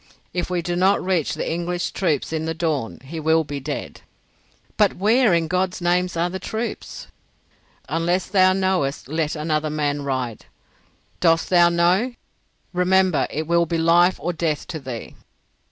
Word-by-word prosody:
If 180 0 -2
we 180 -2 -1
do 175 +1 -2
not 190 +3 +3
reach 180 -5 0
the - - -3
English 175 +1 -2
troops 160 -5 -1
in 160 0 -2
the 165 0 -2
dawn 155 -8 -2
he 160 +5 -7
will 160 +1 +3
be 145 -1 -5
dead." 135 - -6 0.7
"But - - +3
where, 220 +4 +3
in 170 -1 +2
God's 185 +1 -1
name, 175 +1 +2
are 170 +1 +1
the 190 +1 -5
troops?" 220 +5 -5 0.8
"Unless 175 +3 0
thou 185 -1 +5
knowest 185 -9 0
let 155 +1 -1
another 155 0 -1
man 145 -1 -1
ride. 130 -5 -3 0.7
Dost 165 0 +2
thou 175 -1 +6
know? 180 +9 +2 0.6
Remember 180 -1 +2
it 155 +2 -3
will 170 +1 +2
be 165 +1 -1
life 170 +2 +4
or 175 - -2
death 160 -3 -1
to 160 - -4
thee." 130 -5 -7
170 Hz, 160 wpm, -22 LUFS, 155-180 Hz, 0.8 s, thou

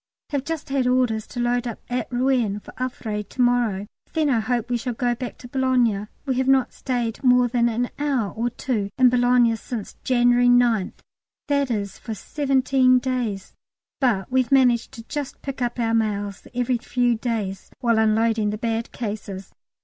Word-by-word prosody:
Have 280 -3 -1
just 325 -3 -4
had 270 -2 +1
orders 250 -4 +1
to 245 - -7
load 240 0 0
up 230 - -5
at 250 +1 -3
Rouen 245 -5 +1
for - - -13
Havre 230 -4 -3
to 230 +5 -5
morrow; 240 -5 +1 0.3
then 310 -3 +2
I 235 - +3
hope 240 +1 -1
we 240 - +2
shall 240 +1 -4
go 245 +1 +1
back 245 +1 -6
to 245 - -11
Boulogne. 245 -5 +1 0.2
We 260 -3 -1
have 260 - 0
not 270 -1 +3
stayed 240 -2 -3
more 250 -1 +5
than 235 0 +2
an 240 +2 -1
hour 270 -8 0
or 235 +2 -1
two 225 -5 -2
in 255 -1 +6
Boulogne 245 -1 +4
since 225 -2 -6
January 245 -1 +4
9th 240 -5 +2 0.5
that 280 -2 +2
is, 200 -4 -3
for 225 - -6
seventeen 265 0 +2
days; 245 -6 -2 0.5
but 235 -6 +1
we've 255 -1 +1
managed 250 -4 +4
to 230 - -9
just 285 +3 -5
pick 275 -2 -5
up 240 0 -1
our 225 -1 +1
mails 205 -3 -1
every 245 0 0
few 245 0 +1
days 220 -4 -3
while 235 -3 +2
unloading 220 0 +2
the 210 - -3
bad 225 +1 -2
cases. 205 -4 -6
245 Hz, 180 wpm, -23 LUFS, 225-255 Hz, 0.5 s, in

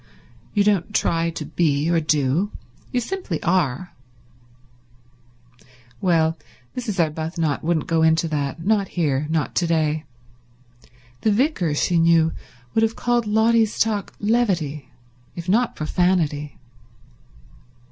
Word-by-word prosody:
You 205 - +4
don't 205 0 +1
try 165 0 +1
to 160 -2 -6
be, 150 -1 0
or 170 -1 +3
do. 155 +4 +1 0.4
You 250 - +1
simply 245 - -4
are." 175 -2 0 2.1
Well, 165 -4 +2 0.4
Mrs. 230 -7 -3
Arbuthnot 160 -1 -1
wouldn't 160 -2 0
go 165 -1 +1
into 160 +1 +3
that—not 165 +8 0
here, 150 -5 -1
not 160 -1 -1
to 175 - +2
day. 155 -1 0 1.2
The 220 - +2
vicar, 205 - +1
she 170 +3 +2
knew, 165 -1 +4 0.4
would 225 - +2
have 225 0 +1
called 240 -2 0
Lotty's 220 +1 +3
talk 210 -3 0
levity, 180 - 0 0.5
if 170 0 -7
not 230 +6 +2
profanity. 155 -3 0
170 Hz, 115 wpm, -22 LUFS, 155-210 Hz, 2.1 s, You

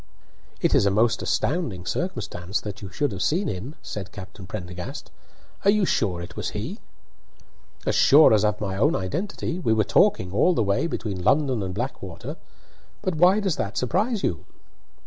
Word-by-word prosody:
"It - - +2
is 100 - +4
a - - +5
most 110 +4 +2
astounding 110 - -1
circumstance 105 - -3
that 105 -1 -7
you 100 - -7
should 145 +7 -1
have 95 -2 -5
seen 175 - +1
him," 115 - -5
said 95 -3 -6
Captain 95 -1 -10
Prendergast. 90 -4 -7 0.5
"Are 200 - +4
you 205 -1 +4
sure 90 - 0
it - - -10
was - - -3
he?" - - -5 1.1
"As - - +1
sure 145 -3 +7
as 105 -1 +4
of 105 -1 +1
my 95 -2 -3
own 145 +10 +3
identity. 170 - -3
We 115 -11 +2
were 110 -1 +3
talking 90 -1 +3
all 175 - +3
the 115 - +2
way 100 +10 +1
between 105 - -4
London 135 -1 +2
and 95 -1 -4
Blackwater. 100 -7 -5 0.7
But 185 - 0
why 180 +6 +5
does 190 -6 0
that 100 - -3
surprise 210 - 0
you?" 85 -3 -1
110 Hz, 175 wpm, -25 LUFS, 95-155 Hz, 1.1 s, sure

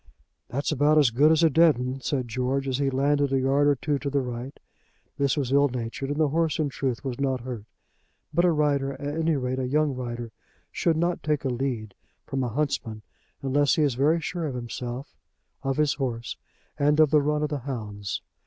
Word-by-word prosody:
"That's 140 +5 -2
about 150 +1 +3
as 145 -6 +5
good 145 +7 +5
as 160 +1 +4
a 165 - +6
dead'un," 135 -5 +3
said 130 -2 -1
George, 130 +3 -1
as 130 0 -1
he 140 -1 +2
landed 140 +1 +1
a 135 - +2
yard 135 +2 +3
or 145 - +4
two 145 +1 -1
to 140 - -3
the 140 -1 0
right. 125 +2 -6 0.6
This 140 -1 +2
was 135 -3 -1
ill 140 +1 +4
natured, 125 +2 -4
and 145 +1 -2
the 155 -2 +3
horse 160 +1 +1
in 155 -2 0
truth 130 -3 -3
was 130 -1 -3
not 130 -2 0
hurt. 120 -4 -6 0.7
But 170 +3 +3
a - - +5
rider, 145 -3 +1
at 145 +2 -5
any 160 0 +1
rate 130 -1 -2
a 130 - -1
young 150 +1 +2
rider, 120 -2 -5 0.4
should 165 -2 +1
not 170 +1 0
take 150 -2 -1
a - - +1
lead 120 -5 -3 0.3
from 135 -1 -2
a 125 - -1
huntsman 115 -5 -2 0.4
unless 140 +1 +3
he 155 - +2
is 140 -3 +2
very 145 +7 +2
sure 165 0 -3
of 135 - -4
himself, 125 +2 -6 0.5
of 135 -1 -1
his 150 -2 +3
horse, 120 -4 -3 0.4
and 145 +1 +3
of 155 -3 +5
the 150 - +5
run 150 +1 0
of 150 - 0
the 145 -1 -2
hounds. 105 -6 -5
140 Hz, 210 wpm, -26 LUFS, 125-150 Hz, 0.7 s, a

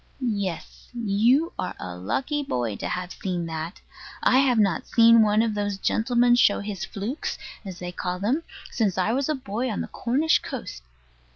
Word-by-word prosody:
Yes. 195 -4 -5
You 235 - +2
are 185 - -3
a 90 -1 -6
lucky 265 - -2
boy 120 - -2
to - - -4
have 180 0 -4
seen 180 -3 -3
that. 160 +2 -5 0.4
I 255 - +5
have 260 -3 +3
not 195 -6 +2
seen 230 0 +6
one 215 +1 +4
of 225 -2 0
those 205 -1 -2
gentlemen 240 +4 +2
show 240 -4 +4
his 200 -3 -5
"flukes," 210 - -4 0.3
as 190 -4 -7
they 180 0 -5
call 180 0 -3
them, 230 - 0 0.3
since 205 -6 0
I 190 +4 +1
was 275 +3 0
a 305 - +1
boy 250 0 -3
on 215 - -2
the - - -4
Cornish 280 +7 +1
coast. - - -7
210 Hz, 180 wpm, -25 LUFS, 180-245 Hz, 0.4 s, seen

